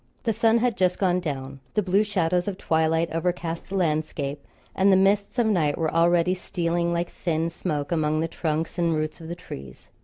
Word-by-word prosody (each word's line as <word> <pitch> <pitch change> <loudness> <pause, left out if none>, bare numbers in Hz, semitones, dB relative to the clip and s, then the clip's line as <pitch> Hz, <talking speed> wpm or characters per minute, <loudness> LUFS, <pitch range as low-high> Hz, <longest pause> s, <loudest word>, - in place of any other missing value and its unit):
The 225 - +1
sun 225 +1 +3
had 235 -1 +1
just 180 -1 +2
gone 180 -2 +2
down. 135 -5 -5 0.2
The 210 - +2
blue 195 +3 +3
shadows 180 -3 0
of 195 -2 -3
twilight 160 0 +1
overcast 170 0 -2
the 195 - -4
landscape, 150 -4 -1 0.3
and 195 +1 +4
the - - +6
mists 200 +4 +2
of 240 - +3
night 170 -9 +2
were 160 -2 -1
already 170 +1 +3
stealing 170 -2 -1
like 170 0 -1
thin 165 -1 -1
smoke 150 -4 -3
among 155 -2 +1
the 165 - 0
trunks 160 +1 -2
and 170 -2 +2
roots 155 +2 -3
of 160 - -8
the 170 - -4
trees. 70 - -10
170 Hz, 195 wpm, -25 LUFS, 160-185 Hz, 0.3 s, the